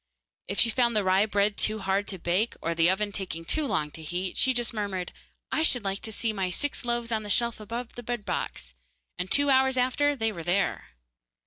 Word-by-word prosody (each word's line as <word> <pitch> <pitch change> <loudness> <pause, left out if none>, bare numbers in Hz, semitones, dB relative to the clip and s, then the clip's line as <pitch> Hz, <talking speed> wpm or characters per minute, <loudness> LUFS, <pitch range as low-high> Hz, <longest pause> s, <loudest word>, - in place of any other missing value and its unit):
If 200 - -3
she 230 - +5
found 235 0 +2
the 210 - +3
rye 190 +3 +3
bread 205 0 +1
too 215 - +1
hard 195 0 0
to 190 - -3
bake, 180 +6 0
or 170 - -1
the 165 +1 +3
oven 205 +2 0
taking 180 -4 -5
too 305 - 0
long 150 - -1
to 160 - -10
heat, 180 +4 -3
she 260 - +4
just 240 -1 -1
murmured, 200 -4 -3 0.4
'I - - +1
should 250 -7 +3
like 195 0 -2
to 220 - -3
see 220 +1 -1
my 190 -3 -1
six 285 +11 -1
loaves 240 -1 -1
on 220 -1 +1
the 210 - -7
shelf 235 +2 +2
above 230 +3 -6
the 245 - -8
bread 240 -2 -4
box,' - - -4 0.5
and 180 +1 -2
two 285 0 +4
hours 265 0 +4
after 270 +4 +2
there 225 -4 -1
they 175 +2 +1
were. - - -5
215 Hz, 225 wpm, -27 LUFS, 190-240 Hz, 0.5 s, she